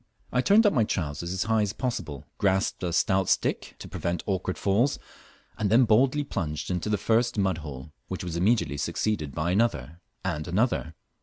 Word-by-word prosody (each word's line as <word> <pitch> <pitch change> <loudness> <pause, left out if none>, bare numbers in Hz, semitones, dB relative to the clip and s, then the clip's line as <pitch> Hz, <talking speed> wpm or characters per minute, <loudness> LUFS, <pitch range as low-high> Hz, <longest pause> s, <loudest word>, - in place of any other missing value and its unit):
I 125 - +2
turned 210 - +5
up 205 - +4
my 115 - +3
trousers 85 -4 -3
as 95 0 -1
high 110 +1 +2
as 105 -2 -1
possible, 95 - -4
grasped 95 -1 +1
a 90 -2 -1
stoat 95 +2 +2
stick - - 0
to - - -9
prevent 85 -1 -3
awkward 95 -2 -2
falls, 110 +8 +2 0.6
and 105 - +1
then 120 +4 +5
boldly 130 +6 +3
plunged 85 - -3
into 90 +3 -2
the 105 - +2
first 115 +3 +1
mud 95 -4 +1
hole, 75 -1 -8
which 95 - -5
was 85 -2 -4
immediately 90 - +1
succeeded 80 -1 -2
by 85 +2 0
another 90 - 0 0.2
and 75 -3 -2
another. 90 -4 0
95 Hz, 180 wpm, -27 LUFS, 85-110 Hz, 0.6 s, turned